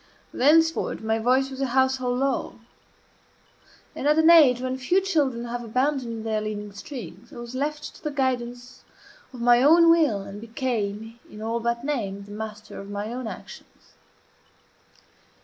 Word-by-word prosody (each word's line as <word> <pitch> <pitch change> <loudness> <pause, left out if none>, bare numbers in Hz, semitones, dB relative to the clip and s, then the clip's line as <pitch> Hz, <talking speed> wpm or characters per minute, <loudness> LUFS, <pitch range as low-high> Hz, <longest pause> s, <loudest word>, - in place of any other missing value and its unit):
Thenceforward 320 0 +2
my 220 0 0
voice 260 +4 +2
was 265 0 -6
a 270 - +1
household 260 -1 +2
law; 270 0 -1 1.4
and 285 - -2
at 300 +1 +4
an 320 +1 +6
age 285 -8 +7
when 255 0 -2
few 265 +9 +2
children 290 -11 0
have 240 0 -5
abandoned 240 -1 -1
their 220 -1 -1
leading 210 -1 -5
strings 245 +5 -9
I - - -12
was 240 0 -8
left 295 +3 -3
to - - -21
the 300 - -1
guidance 250 -3 -3 0.5
of 250 -3 -9
my 240 0 +5
own 330 +4 +6
will, 295 -12 +2
and 200 +1 -9
became, 225 -2 -3
in 210 - -11
all 225 +2 -2
but 235 +1 -2
name, 205 -9 -3
the 205 - -13
master 215 0 -7
of 200 - -9
my 205 +3 -4
own 250 -1 -5
actions. - - -11
245 Hz, 160 wpm, -25 LUFS, 220-275 Hz, 1.4 s, age